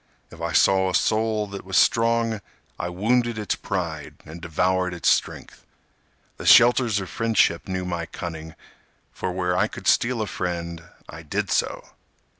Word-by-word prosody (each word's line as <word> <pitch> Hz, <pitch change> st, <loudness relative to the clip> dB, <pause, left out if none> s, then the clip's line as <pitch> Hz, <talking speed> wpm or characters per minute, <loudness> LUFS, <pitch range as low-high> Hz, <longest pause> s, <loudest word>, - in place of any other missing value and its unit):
If -, -, -12 dB
I -, -, -2 dB
saw 95 Hz, -1 st, +3 dB
a 90 Hz, -, -1 dB
soul 110 Hz, +2 st, +1 dB
that 100 Hz, 0 st, -7 dB
was 95 Hz, 0 st, -1 dB
strong 115 Hz, -1 st, +2 dB, 0.4 s
I 85 Hz, -, -3 dB
wounded 115 Hz, +5 st, 0 dB
its 105 Hz, -1 st, -1 dB
pride 85 Hz, -6 st, -4 dB
and 80 Hz, +2 st, -10 dB
devoured 90 Hz, +2 st, 0 dB
its 85 Hz, -, +1 dB
strength. -, -, -1 dB, 0.7 s
The -, -, -8 dB
shelters 120 Hz, -3 st, +6 dB
of 95 Hz, -, -6 dB
friendship 110 Hz, -4 st, +1 dB
knew 95 Hz, -1 st, -3 dB
my 85 Hz, -2 st, -4 dB
cunning 80 Hz, -1 st, -7 dB, 0.6 s
For 95 Hz, -, -4 dB
where 90 Hz, 0 st, -1 dB
I 95 Hz, -, +2 dB
could -, -, -10 dB
steal 120 Hz, -2 st, +2 dB
a -, -, -3 dB
friend 85 Hz, -3 st, -4 dB, 0.2 s
I 80 Hz, -, -10 dB
did 75 Hz, -, -3 dB
so. -, -, -1 dB
95 Hz, 160 wpm, -23 LUFS, 85-110 Hz, 0.7 s, shelters